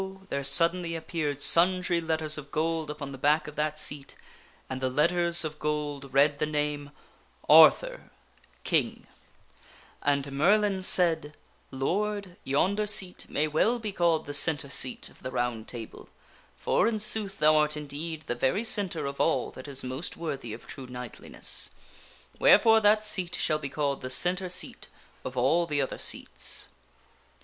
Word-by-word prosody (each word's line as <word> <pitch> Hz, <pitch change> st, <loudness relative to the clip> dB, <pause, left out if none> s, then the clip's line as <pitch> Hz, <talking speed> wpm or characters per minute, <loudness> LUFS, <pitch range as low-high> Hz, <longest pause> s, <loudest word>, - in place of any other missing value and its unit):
there 140 Hz, 0 st, -2 dB
suddenly 165 Hz, +4 st, +1 dB
appeared 160 Hz, -3 st, -3 dB
sundry 180 Hz, +2 st, +3 dB
letters 160 Hz, -1 st, -1 dB
of 145 Hz, -2 st, -8 dB
gold 160 Hz, 0 st, -1 dB
upon 150 Hz, -2 st, -6 dB
the 135 Hz, -, -9 dB
back 150 Hz, +3 st, +2 dB
of 150 Hz, -, -9 dB
that 155 Hz, 0 st, -1 dB
seat, 145 Hz, -2 st, -1 dB, 0.5 s
and 130 Hz, 0 st, -5 dB
the 130 Hz, -, 0 dB
letters 170 Hz, +4 st, +1 dB
of 155 Hz, 0 st, -6 dB
gold 150 Hz, -2 st, -3 dB
read 145 Hz, +1 st, +3 dB
the 150 Hz, -, 0 dB
name, 150 Hz, -1 st, -2 dB, 0.6 s
And -, -, +6 dB, 2.3 s
Merlin 195 Hz, +7 st, +2 dB
said, 165 Hz, -5 st, 0 dB, 0.2 s
" -, -, -36 dB
Lord, 195 Hz, +7 st, -2 dB
yonder 195 Hz, +10 st, +1 dB
seat 195 Hz, -3 st, +1 dB
may 150 Hz, +2 st, 0 dB
well 190 Hz, +11 st, +2 dB
be 220 Hz, -3 st, -5 dB
called 170 Hz, -4 st, +1 dB
the 145 Hz, -, -6 dB
centre 145 Hz, -1 st, +1 dB
seat 130 Hz, -1 st, -3 dB
of -, -, -21 dB
the 130 Hz, -, -5 dB
Round 120 Hz, -3 st, -2 dB
Table, 115 Hz, -3 st, -9 dB, 0.5 s
for, -, -, +1 dB
in 230 Hz, -1 st, 0 dB
sooth, 210 Hz, -1 st, -1 dB
thou 155 Hz, 0 st, +4 dB
art 150 Hz, 0 st, +1 dB
indeed 150 Hz, +2 st, -6 dB
the -, -, -2 dB
very 130 Hz, -, 0 dB
centre 190 Hz, -9 st, +1 dB
of 140 Hz, 0 st, -3 dB
all 165 Hz, -, +1 dB
that 130 Hz, -, -10 dB
is 135 Hz, -2 st, -4 dB
most 130 Hz, +6 st, -5 dB
worthy 135 Hz, -8 st, -5 dB
of 110 Hz, -, -9 dB
true 130 Hz, -2 st, -9 dB
knightliness. 125 Hz, -1 st, -1 dB, 0.7 s
Wherefore 225 Hz, -1 st, +6 dB
that 215 Hz, 0 st, +3 dB
seat 185 Hz, -4 st, -1 dB
shall 155 Hz, -, 0 dB
be 140 Hz, -2 st, -5 dB
called 140 Hz, -1 st, -2 dB
the 130 Hz, -, -5 dB
centre 180 Hz, +6 st, +2 dB
seat 180 Hz, -, -3 dB, 0.4 s
of 130 Hz, 0 st, -7 dB
all 165 Hz, +8 st, +2 dB
the 145 Hz, -3 st, -1 dB
other 135 Hz, -, -2 dB
seats." -, -, -2 dB
155 Hz, 155 wpm, -28 LUFS, 140-180 Hz, 2.3 s, And